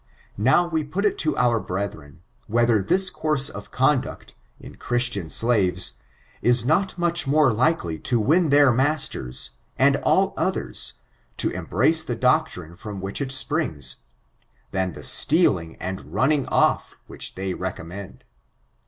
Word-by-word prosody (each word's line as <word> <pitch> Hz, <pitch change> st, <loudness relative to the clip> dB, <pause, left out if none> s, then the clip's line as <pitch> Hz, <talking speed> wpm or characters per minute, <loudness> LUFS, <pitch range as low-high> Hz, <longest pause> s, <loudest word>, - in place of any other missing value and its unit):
Now. 130 Hz, +11 st, +3 dB
we 160 Hz, -2 st, -1 dB
pot 180 Hz, +8 st, -3 dB
it 205 Hz, -, 0 dB
to 155 Hz, -2 st, -1 dB
oar 120 Hz, -2 st, +2 dB
brediren. 90 Hz, -6 st, -6 dB, 0.3 s
vriiether 115 Hz, -3 st, +2 dB
this 190 Hz, -, +2 dB
course 155 Hz, -3 st, 0 dB
of 105 Hz, 0 st, -10 dB
conduct, 130 Hz, 0 st, -1 dB, 0.3 s
in -, -, -13 dB
Christian 120 Hz, -7 st, 0 dB
slaves^ 90 Hz, -, +2 dB, 0.5 s
b 120 Hz, -, +3 dB
not 175 Hz, +7 st, +1 dB
much 170 Hz, -2 st, 0 dB
more 145 Hz, -3 st, +3 dB
likely 110 Hz, -, 0 dB
to 120 Hz, -2 st, 0 dB
win 155 Hz, -, +2 dB
dieir 140 Hz, -3 st, +5 dB
masters, 130 Hz, -, -1 dB, 0.3 s
and -, -, +4 dB
all -, -, +1 dB
others, -, -, -1 dB, 0.4 s
to -, -, 0 dB
embrace -, -, +2 dB
the -, -, -4 dB
doctrine 85 Hz, -1 st, 0 dB
from 105 Hz, +1 st, -8 dB
which 95 Hz, +7 st, -4 dB
it 135 Hz, -2 st, -3 dB
springs, 130 Hz, -, -2 dB, 0.7 s
than 95 Hz, -2 st, -2 dB
the -, -, -10 dB
steaKng 95 Hz, -, +3 dB
and 95 Hz, +1 st, -4 dB
nmning 140 Hz, +1 st, 0 dB
ofi^ -, -, +1 dB
whi^ -, -, -5 dB
diey 95 Hz, -1 st, -4 dB
recommend. 95 Hz, +1 st, -7 dB
120 Hz, 140 wpm, -23 LUFS, 95-150 Hz, 0.7 s, dieir